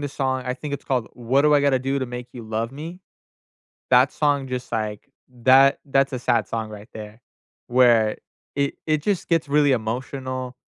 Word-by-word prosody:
the 145 - -3
song 130 -2 -2
I 125 - 0
think 140 +2 -5
it's 140 - -8
called, 125 -4 -1
"What 125 +3 +1
Do 150 0 +4
I 145 - +5
Gotta 140 -2 +2
Do 135 +2 -1
To 130 - -2
Make 125 0 -7
You 120 - -8
Love 110 +1 -3
Me?" 165 +6 -8 0.9
That 130 +2 +5
song 145 -3 0
just, 125 -1 -5
like 110 +1 -3 0.4
that 135 +1 +6
that's 135 0 +2
a 130 - -2
sad 120 -2 +1
song 110 -1 -4
right 105 0 -11
there 110 0 -9 0.5
where 120 -3 +4 0.4
it 140 0 0
it 155 -2 +1
just 200 0 -1
gets 165 -3 +1
really 145 -1 +3
emotional, 130 +2 -4
130 Hz, 190 wpm, -23 LUFS, 120-140 Hz, 0.9 s, that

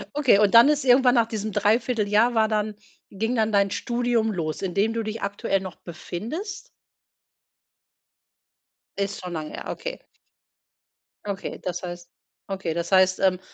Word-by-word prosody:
Okay, 265 -8 +4
und 210 0 +3
dann 235 +4 +9
ist 300 -1 +2
irgendwann 250 0 +5
nach 230 -1 +3
diesem 215 -2 -4
3/4 220 +2 +1
Jahr 215 +4 +3
war 220 -1 +4
dann 215 -1 -1 0.3
ging 225 +5 -2
dann 220 -1 +1
dein 200 -1 +3
Studium 235 -1 0
los, 155 -4 -3
in 185 -3 -3
dem 205 +3 +1
du 230 -1 -2
dich 220 +1 -5
aktuell 200 -1 -1
noch 185 -3 -7
befindest? 235 - -7 2.3
Ist 200 0 -3
schon 180 - -6
lange 155 -2 -5
her, - - -7
okay. - - -6 1.2
Okay, 200 -1 -5
das 175 -1 -4
heißt 175 -1 -7 0.4
okay, 190 -4 -3
das 170 +2 -4
heißt, 185 0 +4
ähm, 185 -2 +3
210 Hz, 155 wpm, -24 LUFS, 190-230 Hz, 2.3 s, dann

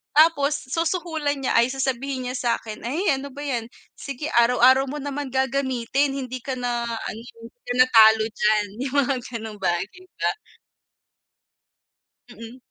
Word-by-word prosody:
Tapos 295 -3 +3
susuhulan 320 -2 -1
niya 265 - -1
ay 235 +2 +4
sasabihin 265 -1 -2
niya 250 - -4
sa'kin, 230 -3 -3
"Ay, 260 +8 -2 0.2
ano 275 +1 -7
ba 285 - -11
yan? 245 -5 -3 0.2
Sige 280 +1 -6
araw-araw 250 +2 +5
mo 295 - -5
naman 285 -1 -5
gagamitin. 265 0 0
Hindi 255 -2 -5
ka 270 - -4
na 240 -1 -1
ano 225 -1 -5 0.2
hindi 230 +1 -14
kana 250 +1 +4
talo 220 -2 +6
diyan." 210 -1 +1 0.2
Yung 270 - -6
mga 275 - +1 0.2
ganong 220 -3 -7
bagay 190 - -2 0.2
ba. - - +2 2.0
Mm, 230 +1 -11
255 Hz, 140 wpm, -23 LUFS, 235-280 Hz, 2.0 s, talo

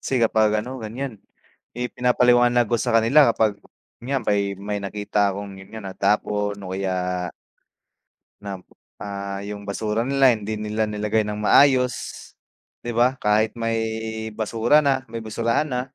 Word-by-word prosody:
kasi 130 - -2
kapag 110 -2 +3 0.2
ano, 130 0 -7
ganiyan, 115 0 -6 0.6
eh, 125 0 -3
pinapaliwanag 120 -1 +4
ko 120 - +2
sa 115 - +2
kanila 120 +5 +5
kapag 110 -2 0 0.4
'yan 130 0 -2
may 100 -1 0
may 100 +1 -4
nakita 105 0 0
akong 100 0 -7
yun 95 - -13
nga, 110 -2 -8
natapon 105 +1 0
o 95 - -6
kaya 90 -2 -2 1.2
na, 100 -1 -4 0.5
ah, 100 -1 -5
yung 100 0 -7
basura 105 +2 -1
nila 135 -1 +5
hindi 110 -1 -3
nila 105 +1 -2
nilagay 105 +1 0
ng 105 0 -4
maayos, 130 +2 +5 0.9
'di 120 - -3
ba? 125 +2 +2
Kahit 105 +1 +2
may 115 0 0 0.5
basura 110 +6 +2
na 135 -3 +1
may 115 - -4
basurahan 115 +6 -1
na, 125 -2 -1
110 Hz, 145 wpm, -23 LUFS, 100-120 Hz, 1.2 s, kanila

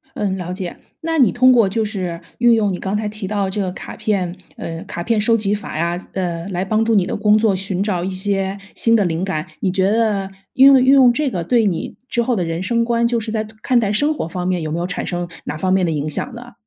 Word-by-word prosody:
嗯， 195 -2 -1
了 180 -1 -5
解。 185 -1 -5 0.3
那 325 0 -1
你 240 -8 +5
通 255 +1 +5
过 230 -5 +4
就 220 +2 0
是 185 -5 -4 0.2
运 240 0 +5
用 210 -3 +1
你 180 - -4
刚 195 +2 -2
才 210 0 -2
提 210 -1 -6
到 205 0 -1
的 190 - -2
这 205 +2 -2
个 185 -2 -1
卡 - - -9
片， 185 -5 -1 0.2
呃， 165 0 -6
卡 175 - -5
片 225 +3 +1
收 230 +2 +3
集 205 -1 0
法 205 -6 -5
呀 170 +1 0
呃， 175 -2 -3
来 185 -1 -2
帮 215 +3 +1
助 225 0 +2
你 190 -3 +3
的 - - -2
工 210 0 +4
作， 215 -3 +2
寻 195 0 -2
找 180 -4 -1
一 190 - -2
些 195 +1 -1 0.2
新 230 0 +3
的 205 - +2
灵 170 +1 -1
感， 155 -5 -3
你 190 - +1
觉 190 +1 +1
得 210 -3 +1 0.2
运 265 +1 +7
用 270 -2 +8
运 265 +1 +5
用 260 -3 +7
这 290 +1 0
个 175 -5 -3
对 235 +3 +3
你 175 -5 -2
之 235 - +1
后 245 +1 0
的 180 - 0
人 165 +2 -3
生 230 +4 +1
观， 235 0 +1
就 235 0 +1
是 220 0 -5
在 215 -1 -1 0.2
看 250 -2 +3
待 210 -4 +1
生 290 +8 +2
活 170 - -4
方 180 +1 -4
面 180 -2 0
有 155 - -3
没 165 - -2
有 175 - -1
产 180 - -4
生 175 -1 -3 0.2
哪 150 - -4
方 185 +3 0
面 190 -2 +3
的 165 - -1
影 150 0 -2
响 245 - -3
呢？ 245 +1 -10
200 Hz, 295 characters per minute, -19 LUFS, 180-230 Hz, 0.3 s, 用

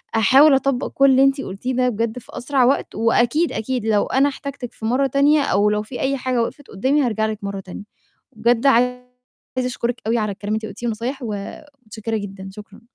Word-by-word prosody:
أحاول 270 +7 +6
أطبَّق 270 -1 0
كل 275 0 +5
اللي 265 +1 +5
أنتِ 275 0 +2
قلتيه 245 +4 -4
ده 250 0 +2
بجد 230 +2 -2
في - - -20
أسرع 265 +1 +1
وقت 270 - 0
وأكيد، 240 +8 +2
أكيد 245 0 -3
لو 215 -2 +2
أنا 275 +2 +2
احتجتِك 275 -3 -7
في 220 - -8
مرّة 255 +5 +2
تانية 285 +3 +3
أو 205 -4 +2
لو 210 0 0
فيه 245 +4 -8
أي 275 +1 0
حاجة 255 -2 -1
وِقِفت 285 +4 -7
قُدّامي، 265 +9 +1
هارجع 220 -4 0
لِك 215 -1 -4
مرّة 200 0 -4
تانية. 190 +1 -9 0.5
بجد 235 +3 +1
عايزة 250 0 +2 0.5
أشكُرِك 245 -1 -2
أوي 230 +1 +2
على 210 -2 -1
الكلام 205 +2 -3
اللي - - 0
أنتِ - - -7
قُلتيه 240 - -5
والنصايح 235 +5 -3
ومتشكِّرة 225 +1 -6
جدًا، 195 -1 -7
شكرًا 210 +1 -13
240 Hz, 200 wpm, -21 LUFS, 215-270 Hz, 0.5 s, أحاول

